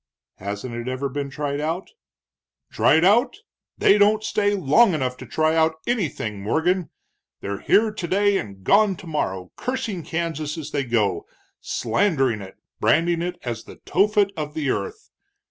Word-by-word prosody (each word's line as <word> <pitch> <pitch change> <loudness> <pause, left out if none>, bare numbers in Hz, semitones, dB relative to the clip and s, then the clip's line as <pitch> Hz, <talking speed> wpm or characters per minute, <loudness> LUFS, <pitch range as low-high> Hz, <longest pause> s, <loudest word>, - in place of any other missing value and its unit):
"Hasn't 105 +5 -5
it 120 +1 -5
ever 130 +2 -2
been 140 +1 -4
tried 145 0 -3
out?" 165 +5 -3 0.8
"Tried 160 +2 +4
out? 235 - +4 0.4
They 205 - +5
don't 210 +1 +4
stay 205 -1 +1
long 185 - +4
enough 130 -4 -1
to 130 - -10
try 155 +6 +1
out 160 0 +3
anything, 145 - -2
Morgan. 170 - 0 0.5
They're 100 0 -4
here 220 +1 +3
today 200 +1 +1
and 100 -3 -8
gone 200 - +4
tomorrow, 120 - -4
cursing 230 -7 -3
Kansas 160 -2 -3
as 155 - -6
they 140 -2 -1
go, 105 -7 0 0.3
slandering 130 - 0
it, 95 -1 -10 0.2
branding 170 +1 +2
it 180 +1 -3
as 115 -3 -5
the - - -11
Tophet 205 +1 +2
of 150 -2 -5
the 145 -4 0
earth. 435 -1 -5
160 Hz, 150 wpm, -23 LUFS, 130-200 Hz, 0.8 s, They